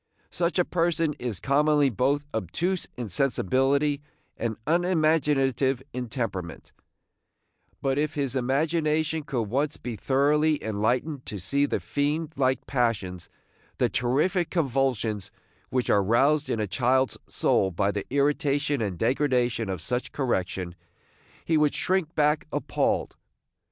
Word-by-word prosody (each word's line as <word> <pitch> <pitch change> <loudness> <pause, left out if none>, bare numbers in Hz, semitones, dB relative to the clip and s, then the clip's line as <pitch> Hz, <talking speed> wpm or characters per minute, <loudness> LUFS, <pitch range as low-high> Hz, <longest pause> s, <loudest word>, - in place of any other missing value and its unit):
Such 170 +1 0
a 180 - +3
person 165 -3 +1
is 120 -6 -3
commonly 145 0 +3
both 140 +6 +1
obtuse 165 - -2
in 120 -2 -4
sensibility 135 +6 +1 0.3
and 115 -2 -3
unimaginative 150 -6 +2
in 125 -1 -4
temperament; 100 - -4 1.1
but 135 0 +1
if 150 0 -1
his 140 -3 -1
imagination 155 +4 +1
could 140 -6 -2
once 140 +8 -1
be 120 -2 -5
thoroughly 145 +6 +2
enlightened 120 +7 -1
to 105 - -4
see 140 +10 +1
the - - -1
fiend 150 +2 -1
like 130 -1 +1
passions, 100 -9 -1 0.5
the - - +2
terrific 155 +9 +1
convulsions, 130 - 0 0.4
which 125 -1 0
are 100 - +4
roused 140 +9 +2
in 115 - -1
a 105 - +1
child's 125 +7 +1
soul 95 - +2
by 100 +3 0
the 100 -1 -4
irritation 145 -1 +1
and 100 -5 -2
degradation 125 - +1
of 90 -4 -4
such 125 +5 -2
correction, 95 -9 -2 0.7
he 160 - +2
would 150 -1 +2
shrink 185 -3 0
back 150 +1 +2
appalled. - - -1
135 Hz, 130 wpm, -26 LUFS, 115-150 Hz, 1.1 s, are